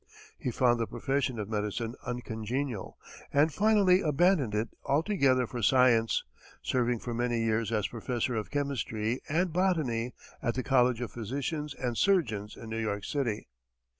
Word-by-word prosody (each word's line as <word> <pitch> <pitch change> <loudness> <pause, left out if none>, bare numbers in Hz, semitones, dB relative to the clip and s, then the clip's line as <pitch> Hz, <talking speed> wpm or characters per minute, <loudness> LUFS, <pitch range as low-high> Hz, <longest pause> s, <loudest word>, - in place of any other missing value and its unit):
He - - -2
found 120 0 +2
the 115 - 0
profession 135 -3 -1
of 105 -2 -3
medicine 110 +2 -2
uncongenial, 120 -1 -4 0.3
and 145 +2 +3
finally 200 -1 +4
abandoned 155 - +2
it 110 +2 0
altogether 140 -5 +2
for 120 +1 -5
science, 115 0 +4 0.4
serving 125 -1 +1
for 120 +1 -5
many 120 -1 0
years 115 -1 0
as 105 -3 +1
professor 120 +1 -2
of 110 -2 -3
chemistry 130 -5 -2
and 170 +2 +1
botany 150 -11 0 0.3
at 120 -2 -1
the 130 - -1
College 125 -2 +3
of 120 -5 -4
Physicians 140 - -3
and 125 -2 -2
Surgeons 110 - +1
in 115 - -9
New 110 0 -3
York 105 -2 -2
City. 120 -6 -2
125 Hz, 150 wpm, -30 LUFS, 115-140 Hz, 0.4 s, finally